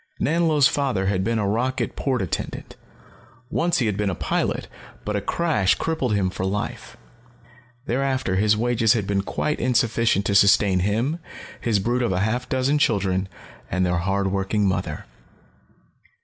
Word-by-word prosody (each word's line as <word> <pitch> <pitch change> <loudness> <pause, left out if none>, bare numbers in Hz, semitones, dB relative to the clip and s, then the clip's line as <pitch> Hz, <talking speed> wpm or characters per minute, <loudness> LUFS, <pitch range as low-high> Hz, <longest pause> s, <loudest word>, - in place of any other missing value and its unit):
Nanlo's 155 -3 +3
father 135 -9 -1
had 95 -1 0
been 115 +2 0
a 105 -2 0
rocket 125 +6 -1
port 130 -6 -1
attendant. 90 - -5 0.8
Once 170 +1 +1
he 120 - +1
had 105 -3 -1
been 105 -1 0
a 90 - -2
pilot, - - -1 0.4
but 105 - -2
a 100 - 0
crash 130 - +1
had - - -15
crippled 135 -9 -1
him 95 -2 0
for 95 - -5
life. 100 +2 -4 0.9
Thereafter, 130 -6 0
his 105 +1 +3
wages 115 -1 +2
had 110 -4 -1
been 100 0 0
quite 150 +9 -2
insufficient 115 -5 +1
to 100 - 0
sustain 100 -1 +5
him, 115 - 0 0.4
his 115 -3 +1
brood 120 +6 0
of 120 - 0
half 110 +7 -1
a - - -30
dozen 130 +3 +1
children, 95 -7 +1 0.4
and 95 +1 +1
their 90 0 +1
hard 95 +2 0
working 100 +2 0
mother. 90 -5 -2
105 Hz, 165 wpm, -23 LUFS, 95-130 Hz, 0.9 s, sustain